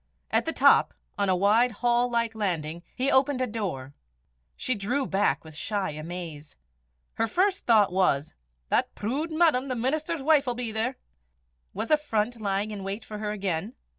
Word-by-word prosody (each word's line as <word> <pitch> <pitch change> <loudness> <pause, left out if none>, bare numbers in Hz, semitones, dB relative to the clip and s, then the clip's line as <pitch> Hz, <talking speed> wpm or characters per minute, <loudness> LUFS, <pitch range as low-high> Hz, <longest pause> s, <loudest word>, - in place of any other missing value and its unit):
At - - +2
the 325 - 0
top, - - +4 0.2
on 200 -2 0
a 185 - +4
wide 215 +6 +3
hall 240 +2 +1
like 235 -1 0
landing, 170 -6 -2
he 260 +2 +1
opened 265 0 +3
a 255 - +1
door. 185 - -4 0.6
She 255 - -1
drew 245 +6 -1
back 200 -3 +1
with 160 -1 -12
shy 200 +2 -2
amaze. 155 -1 -7 0.6
Her 225 - 0
first 380 - 0
thought 215 -5 +5
was 160 -6 +1 0.4
"That - - +1
prood 275 +10 -2
madam, 315 -5 +3
the 255 - -2
minister's 295 +5 -1
wife, 295 -2 +4
'ill 245 - 0
be 240 -2 -3
there!" 225 +4 -1 0.8
Was 230 - -3
affront 240 -6 +1
lying 200 +1 -1
in 200 -2 -6
wait 200 +3 -5
for 210 -1 -7
her 210 -1 -3
again? 200 +1 -3
220 Hz, 170 wpm, -27 LUFS, 195-255 Hz, 0.8 s, thought